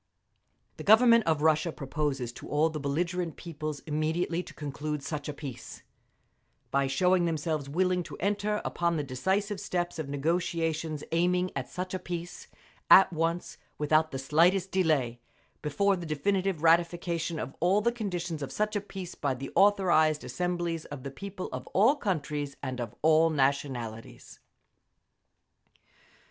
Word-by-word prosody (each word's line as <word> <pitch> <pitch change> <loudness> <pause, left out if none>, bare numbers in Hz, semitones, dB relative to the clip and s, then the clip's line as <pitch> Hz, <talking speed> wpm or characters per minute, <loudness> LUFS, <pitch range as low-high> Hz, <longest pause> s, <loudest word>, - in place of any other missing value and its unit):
The - - -7
Government 230 +2 +6
of 155 -2 +1
Russia 155 +1 +3
Proposes 135 -4 -3
to - - -10
all 155 +2 +2
the 155 - -4
belligerent 170 +4 -2
peoples 155 -3 -6
immediately 160 +3 -1
to - - -12
conclude 150 0 -4
such 150 0 -4
a - - -3
peace, 140 -5 -8 0.9
by 140 0 +2
showing 180 +6 +3
themselves 155 -3 -2
willing 180 +3 +1
to - - -9
enter 205 +2 0
upon 170 -1 0
the 150 - -1
decisive 190 +10 -1
steps 175 -2 -2
of 150 -3 -4
negotiations 160 0 -1
aiming 180 +2 +2
at - - -4
such 185 +1 -5
a 185 - -2
peace, 175 -1 -6 0.4
at 190 -1 +8
once, 165 +2 -2 0.2
without 155 +1 +2
the 135 - -5
slightest 170 +8 +3
delay, 150 -10 +1 0.4
before 195 +7 +2
the 175 -2 -6
definitive 185 +2 0
ratification 170 0 +2
of 135 - -5
all 180 +5 +3
the 235 +3 +2
conditions 180 -8 -4
of 140 - -4
such 215 0 -1
a 205 - 0
peace 190 -3 -8
by 140 -2 -1
the 135 +2 -7
authorised 175 -7 +4
assemblies 175 -2 -2
of 145 -3 -8
the 140 - -5
people 185 +6 -6
of 130 0 -6
all 225 +9 +5
countries 150 - -3
and 130 -2 -3
of 115 -3 -6
all 160 +1 +5
nationalities. 135 -6 -2
165 Hz, 150 wpm, -29 LUFS, 145-180 Hz, 0.9 s, at